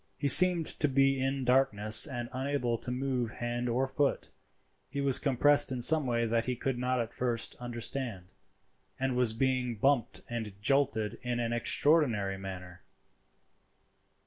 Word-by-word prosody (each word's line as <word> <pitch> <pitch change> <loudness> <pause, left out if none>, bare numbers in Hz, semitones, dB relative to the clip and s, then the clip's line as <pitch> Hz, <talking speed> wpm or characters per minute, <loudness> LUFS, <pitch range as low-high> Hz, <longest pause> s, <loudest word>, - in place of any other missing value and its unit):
He 145 - -2
seemed 175 +3 +8
to 150 - +3
be 135 -1 +1
in 135 0 -3
darkness 110 -3 +5
and 120 -4 -6
unable 130 -2 -3
to 120 - -8
move 125 -2 -3
hand 120 +1 -4
or 125 +3 -1
foot. 135 +1 -2 0.6
He 140 - -6
was 140 -2 +1
compressed 145 +1 +2
in 130 - -4
some 150 +3 +3
way 115 -1 -1
that 115 0 -1
he 125 - -2
could 125 +1 -4
not 125 0 -2
at 115 -1 -5
first 120 -2 -3
understand, 120 -4 -5 0.7
and 130 -1 -2
was 125 -3 0
being 125 0 -2
bumped 135 +3 -1
and 110 -4 -7
jolted 125 -2 0
in 125 -1 -4
an 120 0 -3
extraordinary 120 -6 0
manner. 90 -2 -10
125 Hz, 150 wpm, -29 LUFS, 115-135 Hz, 0.7 s, seemed